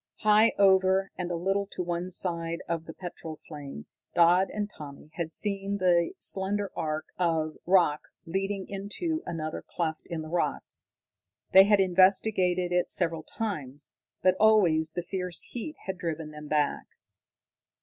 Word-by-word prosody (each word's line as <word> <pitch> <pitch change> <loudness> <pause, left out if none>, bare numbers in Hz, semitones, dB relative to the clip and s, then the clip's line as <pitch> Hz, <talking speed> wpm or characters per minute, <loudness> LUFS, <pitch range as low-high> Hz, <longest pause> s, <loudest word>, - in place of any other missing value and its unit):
High 215 +1 +5
over 190 -1 +4
and 180 -1 -4
a 175 - -2
little 195 +3 0
to 185 - -4
one 175 +1 -3
side 170 -2 -1
of 165 -1 -3
the 165 - -8
petrol 170 -3 -7
flame 145 -3 -9 0.3
Dodd 175 +3 +5
and 210 -1 -3
Tommy 150 -5 -11
had 165 -1 -4
seen 200 +1 -2
the 175 -3 +2
slender 200 +1 +1
arch 155 0 -2
of 160 -3 0
rock 175 -5 +3 0.2
leading 195 +2 -2
into 210 - -3
another 155 -2 -4
cleft 160 -2 -4
in 165 -2 -4
the - - -8
rocks. 170 +1 -2 0.6
They 190 +1 +9
had 205 0 +4
investigated 185 -1 +3
it 180 0 +1
several 165 -3 0
times, 150 - -6 0.3
but 185 - +5
always 175 -8 +4
the 175 - -3
fierce 180 -1 -3
heat 275 +6 -6
had 190 -1 -4
driven 160 -3 -4
them 150 0 -10
back. 150 -1 0
180 Hz, 150 wpm, -28 LUFS, 165-195 Hz, 0.6 s, They